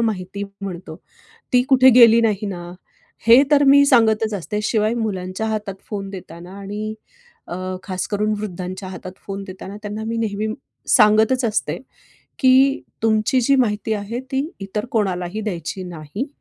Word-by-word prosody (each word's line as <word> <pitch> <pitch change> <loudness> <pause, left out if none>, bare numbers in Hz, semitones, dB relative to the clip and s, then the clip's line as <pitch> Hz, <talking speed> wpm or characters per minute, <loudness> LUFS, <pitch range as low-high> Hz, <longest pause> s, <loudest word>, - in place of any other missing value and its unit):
माहिती 200 -3 -2 0.2
म्हणतो, 175 -4 -6 0.6
ती 250 0 +5
कुठे 260 0 +7
गेली 230 -1 +8
नाही 210 -2 0
ना? 175 -2 -7 0.5
हे 235 +4 +8
तर 290 -1 +5
मी 280 +1 +7
सांगतच 220 -4 +3
असते. 210 +3 -3
शिवाय 215 +1 +1
मुलांच्या 200 -3 -3
हातात 210 -3 -3 0.2
फोन 200 -2 -4
देताना 175 -1 -10
आणि 210 +2 -5 0.5
अ, - - -5 0.3
खास 185 -2 -3
करून 210 +1 0
वृद्धांच्या 185 -1 -6
हातात 185 0 -8
फोन 195 0 -5
देताना 190 +1 -9
त्यांना 210 +1 -5
मी 230 +1 -2
नेहमी 215 -1 -2 0.4
सांगतच 220 +5 +4
असते, 220 -2 -1 0.6
की 265 +1 +4 0.2
तुमची 220 +3 +2
जी 275 +3 +3
माहिती 220 -3 0
आहे 210 +4 -4
ती 270 +1 +1 0.2
इतर 195 +2 -4
कोणालाही 190 -2 -1
द्यायची 185 -2 -4
नाही 175 - -6
210 Hz, 145 wpm, -21 LUFS, 190-230 Hz, 0.6 s, गेली